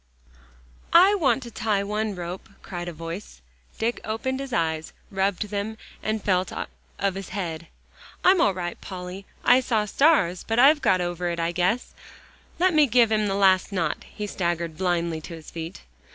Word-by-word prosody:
"I 370 +4 +8
want 300 -8 +2
to 235 - -9
tie 210 -3 0
one 210 0 -2
rope," 175 +1 -6
cried 175 -2 -6
a - - -3
voice. 165 - -7 0.4
Dick 230 +2 -1
opened 260 +5 -2
his 275 -1 -6
eyes, 160 -5 -1 0.2
rubbed 195 +1 0
them, 210 +2 -3 0.2
and 215 -1 -2
felt 185 -2 +1 0.5
of 195 -1 0
his 195 0 -7
head. 170 -4 -4 0.6
"I'm 370 -1 +6
all 195 - +3
right, 175 -2 -5
Polly. 185 +1 -7 0.2
I 245 +2 +7
saw 225 -4 0
stars, 210 - +3
but 225 - -2
I've 290 +4 +6
got 185 -1 +3
over 175 0 -2
it, 170 0 -3
I 165 0 0
guess. 185 +7 0 0.6
Let 365 +1 +3
me 305 -2 +5
give 235 -1 +4
him 215 -1 +2
the 195 - 0
last 190 -1 +4
knot." 170 -5 -1
He 210 - -6
staggered 170 -4 -2
blindly 170 -2 -1
to 165 +2 -8
his 160 -1 -12
feet. 165 +2 -7
195 Hz, 175 wpm, -25 LUFS, 175-225 Hz, 0.6 s, I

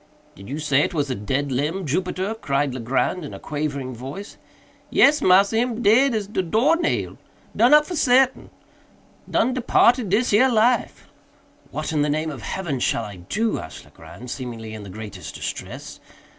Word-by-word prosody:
"Did 95 +3 -13
you 140 - -4
say 150 -3 +1
it 170 - -1
was 145 -3 -1
a - - +1
dead 130 +6 -2
limb, 155 +9 -1
Jupiter?" 185 +6 -2
cried 140 - -1
Legrand 130 +8 -1
in 145 - -7
a - - -9
quavering 140 -4 -4
voice. 135 - -8 0.5
"Yes, 295 +1 +4
massa, 195 +4 +4
him 240 0 -1
dead 235 +5 +4
as 215 -2 -1
de 195 -1 -2
door 225 - +2
nail—done 295 -7 -1
up 300 0 +7
for 355 - -5
sartain—done 255 -2 -1
departed 245 -2 +3
dis 220 +6 +2
here 240 +6 +5
life." 240 +1 +1 0.6
"What - - -4
in 150 - +1
the 150 - +1
name 155 +2 -1
heaven 140 - -4
shall 115 - 0
I 105 -3 -8
do?" 215 - -2
asked 80 - -10
Legrand, 120 +8 -12
seemingly 115 -4 -6
in 110 - -7
the 100 - -10
greatest 105 -1 -8
distress. - - -7
160 Hz, 165 wpm, -22 LUFS, -, 0.6 s, up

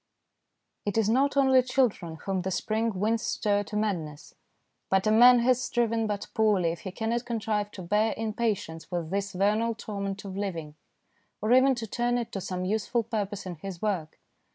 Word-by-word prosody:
It 205 +1 -2
is 220 -2 +3
not 275 +4 +2
only 265 -2 +5
children 245 -10 0
whom 195 -2 -1
the 190 - -2
spring 215 +1 -1
winds 220 +3 +1
stir 205 -3 0
to 210 - -7
madness, 170 -8 -3 0.6
but 190 0 +2
a 215 - +3
man 240 +2 +7
has 255 +1 +3
striven 230 -2 0
but 205 -1 -3
poorly 205 -6 +2
if 165 - -6
he 190 - -6
cannot 230 +4 -2
contrive 215 -3 -2
to 185 - -8
bear 210 +5 +1
in 220 -1 -3
patience 205 -9 -2
with 175 -2 -3
this 200 0 -2
vernal 215 +5 +1
torment 200 -2 -5
of 190 -1 -6
living, 170 -7 -4 0.7
or 215 +3 +2
even 260 +1 +5
to 235 -2 -4
turn 240 +3 0
it 235 -2 -3
to 195 - -4
some 185 0 -3
useful 220 +4 0
purpose 205 -3 -3
in 180 -3 -6
his 185 +2 -7
work. 185 -7 -2
210 Hz, 185 wpm, -28 LUFS, 190-230 Hz, 0.7 s, man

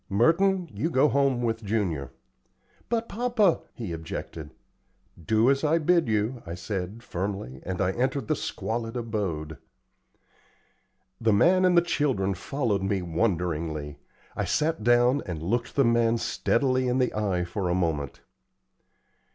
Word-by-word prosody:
Merton, 175 - +3
you 165 - -1
go 150 -2 +4
home 135 -3 +2
with 115 -1 -1
Junior." 95 - -1 0.8
"But, 230 0 0
papa 225 -5 +2
" - - -39
he 110 -9 -5
objected. 80 -1 -6 0.7
"Do 110 +7 +3
as 140 +1 0
I 155 +2 +3
bid 170 0 +2
you," 110 +3 0
I 85 0 -6
said, 95 +4 -5
firmly, 95 - -4
and 95 -1 -3
I 95 -1 +2
entered 130 +2 -1
the - - +1
squalid 115 +1 -3
abode. 95 -10 -3 1.6
The 110 -2 +2
man 185 - +4
and 180 -1 +4
the 170 - +6
children 130 - 0
followed 105 +1 -1
me 95 -1 -1
wonderingly. 80 -5 -2 0.4
I - - -1
sat 160 -5 0
down 120 +3 +4
and 80 -4 -5
looked 115 +7 -1
the 140 - +4
man 115 0 +3
steadily 130 +2 +1
in 125 +1 +1
the 125 -1 +1
eye 100 -4 0
for 90 +1 -3
a 90 - +1
moment. 80 -7 -2
115 Hz, 145 wpm, -26 LUFS, 90-135 Hz, 1.6 s, the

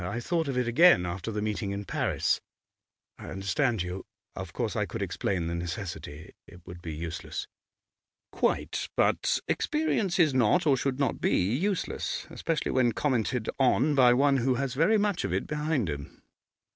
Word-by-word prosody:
I 100 +6 -3
thought 165 +5 -1
of 135 -2 -2
it 125 -1 +1
again 120 - +6
after 90 +5 -4
the 105 -1 -2
meeting 105 -1 -2
in 100 +1 -4
Paris.' - - 0 0.8
'I - - -9
understand 95 +3 0
you. 90 +2 -5 0.3
Of - - -6
course - - -2
I - - 0
could - - -4
explain 90 -4 -2
the 85 - -3
necessity. 85 -3 -6
It 85 -1 -15
would 85 0 -10
be 80 -3 -6
useless.' 85 +1 -5 0.8
'Quite. - - -1
But - - +2
experience 300 - 0
is 160 -6 +4
not, 130 +8 +3
or 145 -3 +5
should 130 0 -1
not 140 -4 -1
be, - - +2 0.2
useless, 190 +5 -2
especially 165 -3 -2
when 120 -3 +2
commented 125 -4 0
on 135 +3 +3
by 125 -3 +6
one 140 +1 +4
who 130 +1 +1
has 135 0 -2
very 165 +11 +3
much 205 -3 0
of - - -2
it - - -1
behind 150 - -1
him. 70 -2 -7
125 Hz, 170 wpm, -28 LUFS, 95-150 Hz, 0.8 s, again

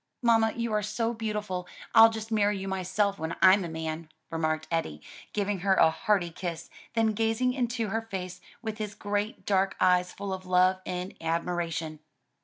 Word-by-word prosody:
"Mamma, 225 -2 +4
you 235 -2 -2
are 210 - +2
so 230 +3 -1
beautiful, 210 -5 -3 0.3
I'll 225 0 +9
just 220 0 -6
marry 205 -2 +2
you 195 0 -5
myself, 195 +2 0
when 160 +1 -3
I'm 190 +1 +6
a 170 - -4
man," 160 0 -5 0.2
remarked 155 -1 -1
Eddie, 120 - -1 0.3
giving 205 -1 -1
her 190 +1 +3
a 160 - +5
hearty 190 -1 0
kiss, 170 -1 -5 0.2
then 225 -1 +3
gazing 225 +3 +1
into 235 -4 -1
her 225 +3 -1
face 185 -5 -6 0.2
with 220 0 -4
his 210 -1 -4
great 205 +1 -3
dark 195 -1 +2
eyes 180 0 +3
full 200 -1 -5
of 185 0 -7
love 185 +1 +4
and 180 +1 -4
admiration. 165 -1 -2
195 Hz, 175 wpm, -28 LUFS, 175-220 Hz, 0.3 s, I'll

